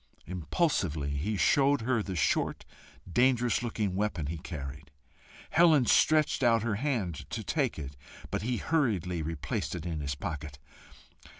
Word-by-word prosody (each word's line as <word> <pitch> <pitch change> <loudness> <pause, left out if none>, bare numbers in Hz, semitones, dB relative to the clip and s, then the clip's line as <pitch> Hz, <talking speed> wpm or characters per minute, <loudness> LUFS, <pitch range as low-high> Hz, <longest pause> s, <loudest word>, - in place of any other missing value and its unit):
Impulsively 85 - -1
he 85 +10 -2
showed 140 - +3
her 115 -1 +1
the 95 -2 -4
short 80 - 0 0.4
dangerous 120 +6 +2
looking 110 -5 -2
weapon 95 -5 -1
he 80 +3 -4
carried. 70 -3 -7 0.6
Helen 160 -5 +5
stretched 155 +5 +4
out 115 -2 +4
her 115 -2 0
hand 115 - -2
to - - -4
take - - 0
it, 70 -2 -6 0.4
but - - -1
he 120 +3 -1
hurriedly 105 - 0
replaced 80 +1 -3
it 90 -1 -6
in 80 -3 -3
his 70 -2 -3
pocket. 75 -3 -5
95 Hz, 140 wpm, -30 LUFS, 75-125 Hz, 0.6 s, Helen